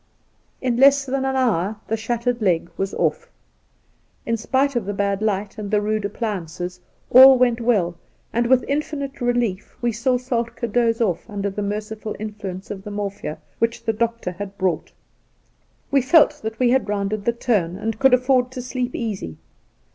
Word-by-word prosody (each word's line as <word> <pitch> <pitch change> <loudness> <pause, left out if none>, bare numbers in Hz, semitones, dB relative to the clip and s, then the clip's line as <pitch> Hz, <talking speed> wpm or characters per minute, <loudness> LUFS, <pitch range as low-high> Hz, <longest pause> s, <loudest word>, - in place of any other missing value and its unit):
In 250 -2 0
less 275 +1 +6
than 265 0 -1
an 265 0 0
hour 220 -6 +1
the 225 - 0
shattered 235 +2 -2
leg 175 -4 +1
was 195 0 -2
off. - - -1 1.0
In 230 - +1
spite 265 +5 0
of 235 -5 0
the 205 0 -3
bad 200 0 0
light 205 -1 -1
and 205 -1 -5
the 210 0 +2
rude 215 0 -1
appliances 180 -4 -4 0.3
all 260 +1 +10
went 245 -1 +2
well, 200 -8 +1 0.4
and 235 +1 +1
with 255 0 +4
infinite 280 -2 -3
relief 240 -5 -1
we 240 -1 0
saw 250 +3 +1
Soltk^ 235 -2 -3
doze 230 -1 +2
off 200 -1 -1
under 200 -1 -3
the 205 - -4
merciful 210 +1 -4
influence 205 -3 -6
of 195 -2 -6
the 210 - -7
morphia 200 -5 -4 0.2
which 230 0 0
the 225 - 0
doctor 230 -3 -1
had 200 +2 -8
brought. 185 -3 -1 1.0
We 275 -1 +4
felt 295 +4 +4
that 220 +1 -5
we 250 -2 +3
had 260 -4 +1
rounded 205 0 -2
the 235 - +2
turn, 205 -8 0
and 220 +1 -3
could 265 -2 +6
afford 250 0 +2
to 255 - -5
sleep 250 0 -3
easy. 200 - -4
225 Hz, 175 wpm, -22 LUFS, 200-250 Hz, 1.0 s, all